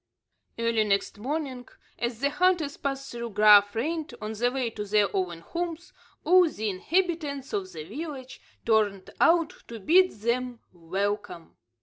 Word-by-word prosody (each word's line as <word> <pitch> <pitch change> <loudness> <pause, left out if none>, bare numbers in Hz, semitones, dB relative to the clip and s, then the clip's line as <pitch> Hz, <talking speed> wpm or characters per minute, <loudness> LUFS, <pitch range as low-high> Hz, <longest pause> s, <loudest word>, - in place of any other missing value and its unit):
Early 230 -1 +1
next 200 0 -1
morning, 260 0 -4 0.3
as 235 0 -3
the 280 +1 +1
hunters 350 -5 +1
passed 275 -1 -4
through 235 0 -5
Graaf 205 0 +6
Reinet, 310 +6 -2
on 215 +1 -5
the 240 +3 +1
way 255 -3 -2
to 210 - -5
their 205 0 +1
own 175 -3 -2
homes, 340 - -5 0.3
all 360 -1 +5
the 220 -6 -3
inhabitants 300 - -1
of 190 -2 -3
the 160 -3 -7
village 260 - -8 0.2
turned 210 -4 +1
out 330 -1 +4
to 230 -1 -8
bid 365 - +5
them 235 +2 -2
welcome. 190 +1 -4
235 Hz, 145 wpm, -27 LUFS, 205-300 Hz, 0.3 s, Graaf